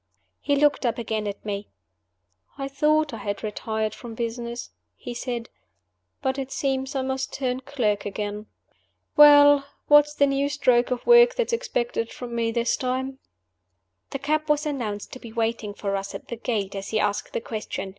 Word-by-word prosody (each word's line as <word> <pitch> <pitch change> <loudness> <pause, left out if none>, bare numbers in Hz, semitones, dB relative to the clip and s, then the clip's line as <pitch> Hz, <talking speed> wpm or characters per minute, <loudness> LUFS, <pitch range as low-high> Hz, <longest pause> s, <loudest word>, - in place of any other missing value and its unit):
He 285 - +1
looked 290 0 +3
up 240 -2 0
again 220 -2 -2
at 205 +1 -6
me. 205 0 -4 0.9
"I 275 -1 -3
thought 300 +1 +2
I - - -4
had 205 -1 -4
retired 220 0 -2
from 230 -1 -9
business," 235 +1 -4 0.2
he 245 - -7
said; 235 -1 -4 0.8
"but 265 +1 0
it 270 0 -5
seems 270 0 -1
I 265 - 0
must 265 0 -2
turn 255 -2 -2
clerk 245 -7 -1
again. 210 +1 -4 0.7
Well? 290 -1 +8 0.3
What 295 0 +8
is 295 - -11
the 285 - +4
new 275 0 +1
stroke 255 -4 +3
of 250 -1 -3
work 480 +1 +7
that's 485 -1 -1
expected 245 - -1
from 245 -1 -7
me 230 -1 0
this 235 0 +1
time?" 260 +1 -2 0.9
The 275 - -3
cab 305 +3 -1
was 300 0 +2
announced 230 -9 -3
to 255 - -8
be 230 - -10
waiting 225 -2 -2
for 200 -1 -2
us 195 0 -4
at - - -9
the 235 - -3
gate 220 -4 -2
as 195 -1 -5
he 220 - 0
asked 205 -1 -1
the - - 0
question. 215 -4 -5
245 Hz, 180 wpm, -25 LUFS, 220-280 Hz, 0.9 s, Well